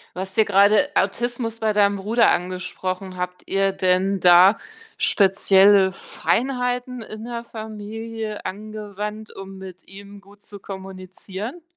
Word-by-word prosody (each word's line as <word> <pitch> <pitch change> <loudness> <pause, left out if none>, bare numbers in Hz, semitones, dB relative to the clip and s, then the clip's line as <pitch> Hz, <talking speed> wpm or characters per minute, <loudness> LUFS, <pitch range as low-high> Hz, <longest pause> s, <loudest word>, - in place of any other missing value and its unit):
Du 185 - -4
hast 190 +2 -7
ja 220 - +6
grade 200 +1 +4
Autismus 230 +2 -1
bei 220 -1 +1
deinem 200 -1 +2
Bruder 220 +5 +3
angesprochen. 185 +1 -4
Habt 180 0 -5
ihr 195 0 +1
denn 190 +1 +1
da 180 +4 +6 0.4
spezielle 195 0 +4
Feinheiten 250 +3 -2
in 215 +1 -9
der 235 -1 -5
Familie 220 0 -7
angewandt, 210 +1 -7
um 195 0 -9
mit 185 -1 -11
ihm 200 +1 -12
gut 200 +1 -20
zu 205 -1 -11
kommunizieren? 190 - -8
200 Hz, 130 wpm, -22 LUFS, 190-220 Hz, 0.4 s, ja